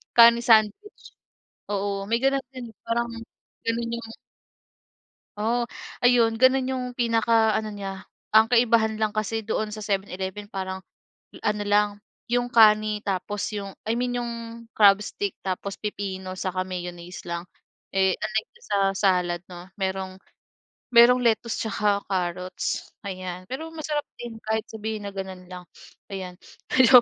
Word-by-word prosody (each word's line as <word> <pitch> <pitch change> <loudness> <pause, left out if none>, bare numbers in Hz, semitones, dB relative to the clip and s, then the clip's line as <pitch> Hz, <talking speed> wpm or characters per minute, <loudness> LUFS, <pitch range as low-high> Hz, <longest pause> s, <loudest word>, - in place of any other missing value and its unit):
kani 235 0 +8
sandwich. 225 - +3 0.7
Oo, 200 0 -1
may 230 - +3
gano'n 270 0 +2
din, 245 -2 -7 0.2
parang 235 +1 0 0.6
ganun 230 +1 -1
'yung 235 -1 -5 1.3
Oo, 235 +3 0 0.3
ayun, 245 -2 +5
ganun 260 0 +5
yung 260 -1 -2
pinaka 230 -2 +3
ano 215 -1 -1
niya. 195 -2 -6 0.3
Ang 220 +1 +7
kaibahan 230 -2 +4
lang 215 -1 0
kasi 215 0 -2
doon 220 -1 -1
sa 215 0 -7
7-Eleven 195 0 -3
parang 190 -1 -4 0.6
ano 210 0 +1
lang, 205 0 +4 0.4
'yung 245 0 +2
kani 215 -2 +5
tapos 200 +1 -2 0.2
'yung 195 -1 -5
I 220 - +1
mean 245 0 -1
yung 235 0 -3 0.5
crab 200 -1 +7
stick, 200 -1 -3
tapos 195 +1 -3
pipino, 190 -3 -4
saka 185 0 -2
mayonnaise 180 -1 -7
lang. 170 0 -3 0.5
Eh 190 -1 +3
unlike 215 0 -2
dun 475 0 -19
sa - - +3 0.2
salad 180 -3 +2
'no, 175 0 -9
merong 190 -1 -2 0.8
merong 245 +2 +8
lettuce 230 0 +2
'tsaka 205 -2 0
carrots, 180 0 -2
ayan. 185 -1 -5
Pero 315 +5 -5
masarap 300 -2 -2
din 235 -2 -7
kahit 220 0 +1
sabihin 215 -1 -4
na - - -5
gano'n 190 -2 -6
lang, 180 -1 -8 0.5
ayan. 185 -2 -6 0.4
Ayan 255 -1 +9
210 Hz, 140 wpm, -25 LUFS, 190-235 Hz, 1.3 s, Ayan